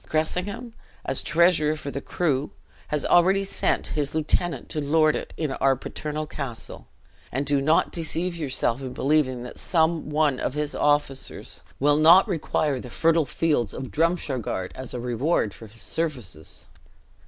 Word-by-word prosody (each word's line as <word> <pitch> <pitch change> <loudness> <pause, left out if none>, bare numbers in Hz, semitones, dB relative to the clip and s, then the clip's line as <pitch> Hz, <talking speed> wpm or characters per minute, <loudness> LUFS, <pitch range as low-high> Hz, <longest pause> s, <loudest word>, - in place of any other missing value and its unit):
Cressingham, 200 +9 -1 0.3
as 135 - 0
treasurer 160 -1 +3
for 145 -2 -6
the 140 - -4
crew, 145 -5 -1 0.4
has 150 -1 -1
already 190 +3 +4
sent 195 - 0
his 145 0 -2
lieutenant 160 +2 0
to 155 - -2
lord 155 +1 +3
it - - -5
in 155 -4 -1
our 135 0 +2
paternal 150 +3 -5
castle; 135 -6 -6 0.4
and 135 +3 -1
do 140 0 +2
not 155 +4 +3
deceive 170 +2 -2
yourself 135 -5 0
in 130 -2 -5
believing 130 -2 +1
that 125 - -9
some 160 -2 +1
one 150 -3 +2
of 130 - -2
his 150 -1 -1
officers 145 -2 -1 0.2
will 145 +1 +4
not 170 +6 +7
require 155 -6 0
the 125 - -8
fertile 165 +4 +2
fields 135 -6 0
of 130 -1 -6
Drumshargard 145 - -1
as 130 -1 -7
a - - -3
reward 120 -1 0
for 115 - -11
his 115 +2 -10
services! 125 - -4
150 Hz, 155 wpm, -25 LUFS, 130-165 Hz, 0.4 s, not